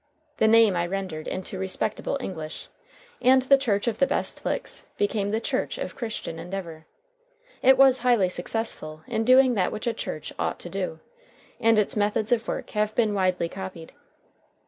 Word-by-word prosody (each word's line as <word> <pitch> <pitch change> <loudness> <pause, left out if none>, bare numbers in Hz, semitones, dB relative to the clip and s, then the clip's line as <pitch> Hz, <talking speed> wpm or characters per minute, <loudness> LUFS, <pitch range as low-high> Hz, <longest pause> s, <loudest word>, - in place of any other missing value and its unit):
The 220 - +3
name 225 -3 +6
I 175 0 0
rendered 185 -4 -4
into 185 0 -3
respectable 195 +7 -2
English, 160 - -6 0.5
and 260 +1 +5
the 275 +1 +6
Church 220 -4 0
of 225 -2 -1
the 275 - +4
Best - - -2
Licks - - -3
became 205 0 0
the 220 +2 0
Church - - -2
of - - -5
Christian 220 -8 -5
Endeavor. 170 -2 -7 0.7
It 265 +1 +6
was 265 -1 +6
highly 235 -6 +3
successful 175 -4 -3
in 225 -1 -1
doing 255 +1 +6
that 190 -5 +1
which 215 - -5
a 235 - +1
church - - -6
ought - - -1
to - - -7
do, - - -4 0.6
and 225 -1 +4
its 210 - +1
methods 210 +1 0
of 235 -2 +1
work - - -4
have 210 0 -1
been 220 -3 +2
widely 185 -3 +1
copied. 185 -2 -8
210 Hz, 170 wpm, -25 LUFS, 185-235 Hz, 0.7 s, name